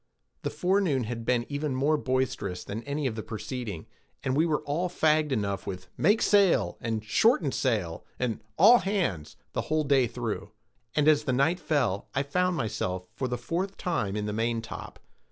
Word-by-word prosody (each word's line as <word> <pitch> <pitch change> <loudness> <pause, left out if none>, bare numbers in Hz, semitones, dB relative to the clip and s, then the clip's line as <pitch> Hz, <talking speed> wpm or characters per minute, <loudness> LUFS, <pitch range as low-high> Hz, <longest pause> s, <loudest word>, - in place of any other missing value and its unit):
The - - -2
forenoon 180 -8 +1
had 115 0 -5
been 120 -1 +1
even 145 -1 -2
more 145 +4 +2
boisterous 130 -10 -1
than 105 +3 -5
any 145 +1 -2
of 130 - 0
the 110 - -4
preceding, 110 -5 -5 0.4
and 130 - 0
we 160 +4 +3
were 150 -2 0
all 165 +5 -1
fagged 155 -3 +2
enough 100 -5 -1
with 90 -1 -6
"Make 210 +2 +3
sail," 200 -3 +4
and 110 -2 -2
"Shorten 165 - +3
sail," 105 -13 -1
and 120 -4 -2
"All 225 +8 +8
hands," 165 - -1 0.2
the - - 0
whole 155 0 0
day 135 -3 +3
through; 115 -2 -4 0.4
and 150 -1 +3
as 155 -1 +5
the 130 - +1
night 150 +8 +2
fell, 125 - 0
I 135 - +2
found 180 +5 0
myself, 105 -7 -2
for 130 - -2
the 125 0 -2
fourth 180 - -3
time, 160 - -1
in 105 0 -2
the 105 - -2
maintop. 115 +1 -3
130 Hz, 180 wpm, -28 LUFS, 110-155 Hz, 0.4 s, All